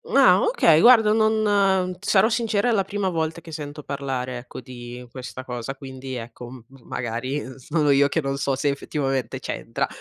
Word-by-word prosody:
Ah, - - +6
okay, 310 - +4
guarda 230 -3 +7
non 205 -4 +2
sarò 205 +1 +3
sincera, 230 -1 +1
è - - +3
la 195 - +2
prima 195 0 -2
volta 160 0 -2
che 165 - -12
sento 150 -1 -7
parlare 130 -3 -4
ecco 125 +1 -10
di 125 0 -9
questa 130 0 -8
cosa, 125 +1 -5
quindi 130 -1 -8
ecco 120 0 -8
m 125 -3 -11 0.2
magari, 125 +4 -3
uhm, 130 - -9
sono 150 +3 0
io 140 +1 +5
che 160 - 0
non 135 -1 -2
so 140 -1 0
se 145 +2 0
effettivamente 135 -3 -2
c'entra, - - -3
140 Hz, 180 wpm, -23 LUFS, 130-190 Hz, 0.2 s, guarda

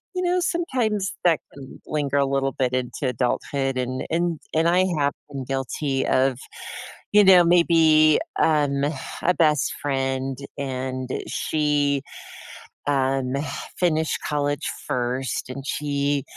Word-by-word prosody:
you 365 - -1
know, 360 +1 +2
sometimes 245 - -1
that 165 -4 +4
can 135 -1 -11
linger 145 -2 -1
a 140 - +3
little 135 0 0
bit 130 -2 -1
into 130 +2 -2
adulthood, 130 +2 -1
and 130 +1 -2
and 170 -1 0 0.2
and 165 +1 +3
I 175 +2 +4 0.2
have 140 0 +2 0.2
been 135 -3 -6
guilty 135 +1 -2
of, 130 -1 +2 0.8
you 210 0 +7
know, 185 -2 +8
maybe, 160 -3 +5 0.2
um, 145 -3 +2 0.4
a 180 - +3
best 150 -3 +2
friend, 135 -1 -1 0.2
and 130 -1 -4 0.2
she, 145 -2 +1 0.9
um, 135 -2 +1 0.5
finished 160 -3 +1
college 145 -1 -1 0.2
first, 125 -2 -2
and 135 +1 -6
she 145 -2 -1
140 Hz, 125 wpm, -23 LUFS, 135-160 Hz, 0.9 s, know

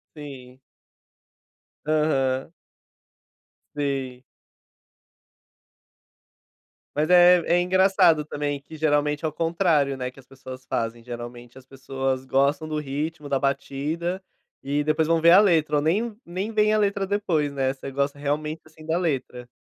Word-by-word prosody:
Sim. 130 -4 -11 1.3
Aham. 140 -3 +1 1.2
Sim. 135 -3 -3 2.7
Mas 150 +3 0
é 180 0 +7
é 175 +1 +3
engraçado 185 -4 +3
também, 145 -1 -3
que 160 - -12
geralmente 150 -1 0
é 160 - +1
o - - -3
contrário, 165 -4 +1
né, 125 -1 -3
que 135 - -17
as 135 - -17
pessoas 130 -1 -11
fazem. 115 0 -3
Geralmente 120 0 -9
as 130 - -14
pessoas 135 0 -3
gostam 140 +4 +1
do 155 -1 -3
ritmo, 150 +2 -4
da 135 -1 +1
batida, 155 +6 -2 0.4
e 145 +1 -1
depois 155 +1 +1
vão 165 0 +2
ver 170 +1 +6
a 190 - +9
letra, 160 -7 +3
ou - - +1
nem 205 +8 0
nem 185 +5 -4
veem 215 -1 +2
a 215 - +3
letra 200 -1 0
depois, 175 -8 -1
né. 135 -1 0
Você 135 0 -8
gosta, 140 +1 -1
realmente, 150 +2 -3
assim, 155 0 -16
da 160 +1 0
letra. 130 -7 -3
150 Hz, 140 wpm, -24 LUFS, 135-165 Hz, 2.7 s, a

